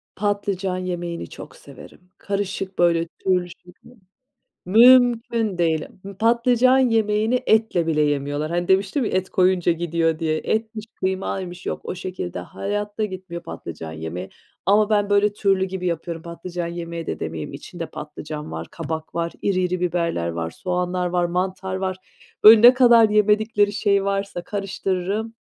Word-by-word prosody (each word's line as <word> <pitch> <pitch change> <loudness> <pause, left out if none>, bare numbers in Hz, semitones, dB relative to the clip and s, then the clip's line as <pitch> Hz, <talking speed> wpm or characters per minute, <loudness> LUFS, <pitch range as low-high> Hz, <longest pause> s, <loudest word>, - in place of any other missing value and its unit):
Patlıcan 200 -2 -1
yemeğini 175 -2 -4
çok - - -11
severim, - - -14 0.2
karışık, 195 -1 -4
böyle, 170 -1 +3
türlü 180 -2 +1
şeklinde. 230 +9 -17 0.7
Mümküne 230 -2 +5
değil. 165 -2 +1 0.3
Patlıcan 240 +3 +4
yemeğini 225 0 +2
etle 220 -6 +2
bile 155 -2 +1
yemiyorlar. 145 +1 -1
Hani, 175 +1 -1
demiştim 195 +7 +2
ya, - - -1
et 185 0 -1
koyunca 180 -2 +2
gidiyor 165 -1 0
diye, 160 -1 0
etmiş, 220 0 -2
kıymaymış, 185 -1 -3
yok, - - -3
o - - -4
şekilde 175 - -5
hayatta 205 - -3
gitmiyor 185 -4 -7
patlıcan 80 -1 -8
yemeği 80 +4 -6 0.4
ama 210 +2 +4
ben, 205 -1 +2
böyle, 205 0 +3
türlü 195 -2 +1
gibi 190 -1 -4
yapıyorum. 170 -1 -3
Patlıcan 170 +1 -6
yemeği 170 -1 -6
de - - -4
demeyeyim, 80 - -5
içinde 165 +4 -7
patlıcan 150 - -8
var, 80 +1 -5
kabak 160 -1 -6
var, 170 0 -2
iri 195 -2 +1
iri 180 0 -1
biberler 170 - -1
var, 85 -1 -3
soğanlar 180 - -2
var, 175 0 0
mantar 185 +2 -2
var. 190 -1 -2 0.5
Önüne 225 +3 +9
kadar 240 -3 +6
yemedikleri 210 0 +2
şey 200 -1 +1
varsa 200 -2 -2
karıştırırım. 195 +2 -3
185 Hz, 140 wpm, -22 LUFS, 170-210 Hz, 0.7 s, Önüne